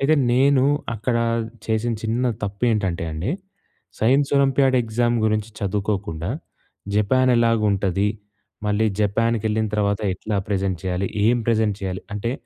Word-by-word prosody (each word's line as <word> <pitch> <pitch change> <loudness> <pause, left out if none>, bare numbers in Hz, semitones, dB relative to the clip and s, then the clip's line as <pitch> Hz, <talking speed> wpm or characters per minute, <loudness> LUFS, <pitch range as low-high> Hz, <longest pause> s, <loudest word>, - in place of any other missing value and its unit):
అయితే 150 +3 +4 0.2
నేను 135 +1 +4 0.3
అక్కడా 115 +2 0 0.4
చేసిన 115 +1 0
చిన్న 115 +3 0 0.2
తప్పేంటంటే 100 -4 0
అండి, 80 - -3 0.7
సైన్స్ 135 +5 +3
ఒలంపియాడ్ 135 -1 +3
ఎగ్జామ్ 120 +1 0
గురించి 110 0 0
చదువుకోకుండా 100 -3 -2 0.6
జపానెలాగుంటది 105 -4 +2 0.6
మళ్ళీ 105 +2 +2
జపాన్‌కెళ్ళిన 110 +1 +1
తర్వాత 100 -1 +1
ఎట్లా 105 +3 -3
ప్రెజెంట్ 95 -3 -1
చేయాలి? 95 +1 -1 0.2
ఏం 120 +2 +4
ప్రెజెంట్ 110 -3 +2
చేయాలి? 95 -1 -4
అంటే 115 +4 -2
110 Hz, 110 wpm, -22 LUFS, 100-120 Hz, 0.7 s, అయితే